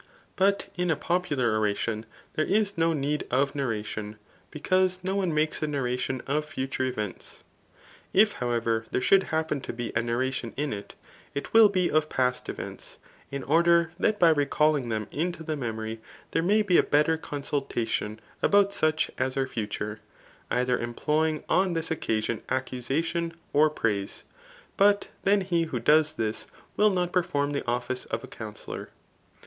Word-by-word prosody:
But 200 +1 +2
in 180 -1 0
a 160 - +3
popular 145 -10 0
oration, 110 +1 -1 0.3
there 155 - 0
is 200 +1 +2
no 165 0 +2
need 150 -1 -1
of 135 +2 +1
narradon, 110 -5 -3 0.3
because 185 +3 +1
no 190 +1 -1
one 190 -4 +1
makes 155 0 0
a 155 - 0
narration 130 -2 -2
of 150 +2 0
future 135 -3 -2
events. 105 -7 -5 0.7
If, 210 +2 +5
however, 115 -2 0
there - - 0
should 195 +9 +5
happen 160 -3 -1
to - - -5
be 120 0 -4
a 110 - +3
narration 120 0 -2
in 145 0 -1
it, 100 -1 -8 0.4
it 140 - -4
will 225 -2 +8
be 185 -3 +1
of 155 0 +2
past 125 -1 0
events, - - -7 0.3
in 140 -1 -4
order 170 +2 +4
that 215 +1 +2
by 170 -4 +6
recalling 145 -3 +2
them 110 -2 -2
into 170 +2 -2
the 155 -1 -2
memory, 110 -4 -4 0.3
there 165 - +1
may 210 +5 +3
be 185 -4 +4
a - - +8
better 150 +2 +3
consultation 135 -8 -3 0.2
about 200 0 +4
such 155 -4 +1
as 130 +1 -1
are 135 - +2
future, 105 -3 -4 0.5
either 125 0 +1
employing 150 +6 0
on 185 -1 +2
this 165 -1 -2
occa 110 -9 -1
son 115 - -2
accusation 140 +6 -1 0.2
or 150 +2 +5
praise; 105 -9 -2 0.5
but 205 0 +4 0.2
then 200 0 +4
he 170 -3 +1
who 160 - -3
does 155 0 +4
this, 110 -5 -2 0.3
will 210 0 +5
not 180 -2 -1
perform 145 -5 +1
the 140 -3 -3
office 125 +1 -2
of 115 - -4
a - - -8
counsellor. 105 -2 -8
145 Hz, 165 wpm, -27 LUFS, 120-170 Hz, 0.7 s, will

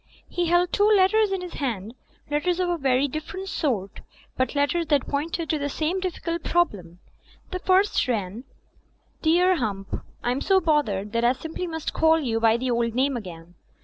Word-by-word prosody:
He 350 -1 -1
held 350 +1 +2
two 410 0 +4
let 385 -3 +5
ters 435 -2 +3
in 385 -1 -1
his 360 -1 -7
hand, 225 -6 -3 0.4
letters 345 +5 0
of 360 -1 +1
a 350 - 0
very 270 0 +2
different 310 +7 -6
sort, 215 - -2 0.3
but 260 +3 -1
letters 310 +4 +1
that 290 -3 +2
pointed 320 +3 -2
to 310 - 0
the 285 0 -2
same 315 +6 -1
difficult 340 -2 -3
problem. 195 - 0 0.5
The 365 - -3
first 380 -3 +2
ran: 215 -1 -2 0.8
"Dear 355 +3 +4
Hump— 200 -6 -3 0.2
"I'm 250 +3 0
so 385 -1 +4
bothered 230 - 0
that 230 0 0
I 240 +1 +4
simply 320 +6 -5
must 320 -2 -4
call 320 0 +4
you 235 -7 -1
by 225 0 +4
the 255 +1 -2
old 235 -1 0
name 270 +1 +1
again. 175 -6 -8
295 Hz, 180 wpm, -25 LUFS, 235-350 Hz, 0.8 s, let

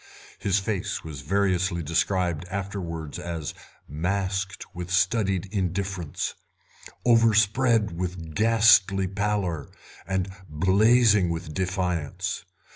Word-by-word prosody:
His 100 -1 +1
face 95 -1 -2
was 75 -4 -7
variously 90 +1 0
described 85 +1 0
afterwards 90 -5 -5
as 85 -4 -4 0.3
masked 95 +5 -2
with 90 -1 -6
studied 95 +1 +1
indifference, 95 -3 -2 0.7
overspread 115 -1 +4
with 85 -2 -5
ghastly 105 -3 +5
pallor, 95 -5 -2 0.4
and 95 0 0 0.2
blazing 100 +4 +4
with 80 -2 -4
defiance. 90 -1 -2
95 Hz, 90 wpm, -26 LUFS, 85-100 Hz, 0.7 s, ghastly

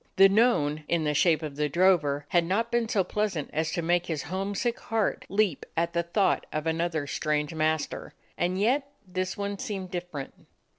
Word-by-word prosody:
The 195 +1 +8
known, 195 -9 +2
in 170 -2 +1
the 150 -1 +1
shape 155 +1 +3
of 145 -2 -6
the 150 0 0
drover, 150 -4 +3
had 175 -1 +3
not 215 +7 0
been 235 -2 +1
so 195 -4 +2
pleasant 195 -7 -2
as 160 +1 0
to 170 - -1
make 175 +1 +1
his 155 -4 -2
homesick 195 +7 -2
heart 225 -2 -1
leap 200 -6 +1
at 170 0 +1
the 170 - +2
thought 170 +4 +1
of 155 0 -3
another 160 -2 0
strange 150 +1 -1
master. 155 -1 -1 0.2
And 180 +2 0
yet 270 +7 +2 0.2
this 185 0 -3
one 200 -1 -3
seemed 190 -3 -4
different. 175 -6 -6
175 Hz, 185 wpm, -27 LUFS, 155-200 Hz, 0.2 s, The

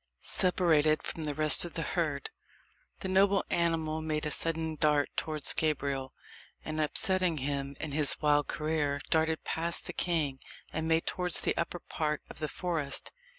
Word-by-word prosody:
Separated 160 -4 +3
from 160 - -4
the 145 -1 -3
rest 155 -1 +4
of 175 - -6
the 165 - -3
herd, 155 -6 -2 0.7
the - - -2
noble 195 +1 +3
animal 160 -2 0
made 155 -1 -2
a 150 - -2
sudden 160 0 +1
dart 150 -1 +2
towards 155 -2 +1
Gabriel, 140 -4 -1 0.5
and 155 0 -2
upsetting 180 +3 +2
him 140 0 -3
in 155 - -4
his 145 0 +3
wild 145 -1 +2
career, 150 -2 -1
darted 160 0 +1
past 170 +1 +1
the - - -4
king, 155 -6 -1 0.3
and 160 0 -2
made 160 0 +2
towards 180 -2 +1
the - - 0
upper 170 +1 -2
part 150 -2 -3
of - - -12
the 155 -1 -3
forest. 165 -6 -2
155 Hz, 160 wpm, -30 LUFS, 150-165 Hz, 0.7 s, rest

